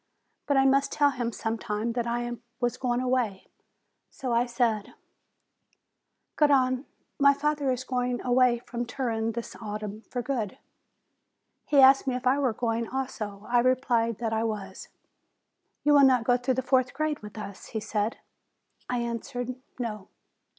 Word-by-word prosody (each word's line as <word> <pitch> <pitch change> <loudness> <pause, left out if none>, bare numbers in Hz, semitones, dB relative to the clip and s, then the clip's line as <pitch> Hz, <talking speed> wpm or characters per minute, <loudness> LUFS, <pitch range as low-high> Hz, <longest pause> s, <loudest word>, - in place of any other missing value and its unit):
But 285 - +3
I 270 - +5
must 275 +1 +3
tell 290 -1 +3
him 240 -3 -2
sometime 225 0 -2
that 235 0 -1
I 240 0 -1 0.3
was 245 -2 0
going 245 -1 -1
away. 250 -6 0 0.6
So 255 -3 -4
I 235 +1 +2
said: 235 -4 0 1.4
"Garrone, 265 -3 +3 0.3
my 280 0 +6
father 295 -1 0
is 255 0 -2
going 250 -1 -1
away 250 -1 +4
from 240 0 -3
Turin 230 -3 -2
this 235 +1 -6
autumn, 210 0 -5
for 245 -1 -3
good." 230 -8 -2 1.1
He 280 -2 +5
asked 270 +1 +7
me 255 - +1
if 250 +1 -5
I 260 +3 +3
were 265 -4 +2
going, 230 0 -1
also. 215 -6 -4
I 240 0 +3
replied 240 -3 +2
that 225 -2 -2
I 220 0 +1
was. 205 -4 -4 1.0
"You 295 - +4
will 285 - +7
not 255 -3 +5
go 245 +1 +3
through 250 +1 0
the 260 - -1
fourth 255 0 +2
grade 310 0 -1
with 210 0 -11
us?" 200 -2 -8
he 220 - -3
said. 215 +1 -2 0.7
I 250 - 0
answered, 245 +1 -3 0.2
"No." 215 -5 -4
245 Hz, 155 wpm, -27 LUFS, 225-260 Hz, 1.4 s, asked